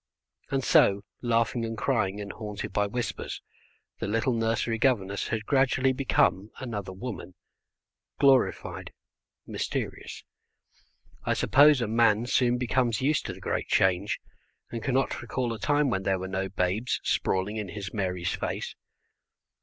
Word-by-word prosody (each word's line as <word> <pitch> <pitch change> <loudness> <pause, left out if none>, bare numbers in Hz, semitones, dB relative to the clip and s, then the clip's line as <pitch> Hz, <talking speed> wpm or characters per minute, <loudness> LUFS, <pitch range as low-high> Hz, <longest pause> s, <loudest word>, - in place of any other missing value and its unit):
And 135 -1 0
so, 100 -4 +4 0.2
laughing 115 0 +1
and 115 0 -4
crying, 105 -6 0
and 100 -1 -5
haunted 105 -2 -6
by 105 0 +2
whispers, 105 -3 -4 0.6
the - - -2
little 115 +4 +1
nursery 115 0 0
governess 100 -6 +1
had 110 -1 -2
gradually 135 -1 +3
become 110 -6 +1
another 105 -7 -5
woman, 95 -3 -7 0.8
glorified, 135 -2 +2 0.5
mysterious. - - -4 1.0
I - - +1
suppose 145 0 +5
a 115 - 0
man 115 0 +3
soon 125 0 +2
becomes 120 -1 0
used 150 +2 +1
to 95 - -4
the 95 - -12
great - - -2
change, 95 +2 +2 0.5
and 115 - -4
cannot 135 +3 0
recall 120 0 -2
a 110 - -7
time 145 +3 +2
when 95 - 0
there 95 0 +1
were 95 0 -5
no 95 0 -2
babes 95 +5 0
sprawling 95 +3 0
in 105 -2 -3
his 100 +1 -6
Mary's 90 -4 -1
face. - - -3
115 Hz, 140 wpm, -27 LUFS, 100-125 Hz, 1.0 s, suppose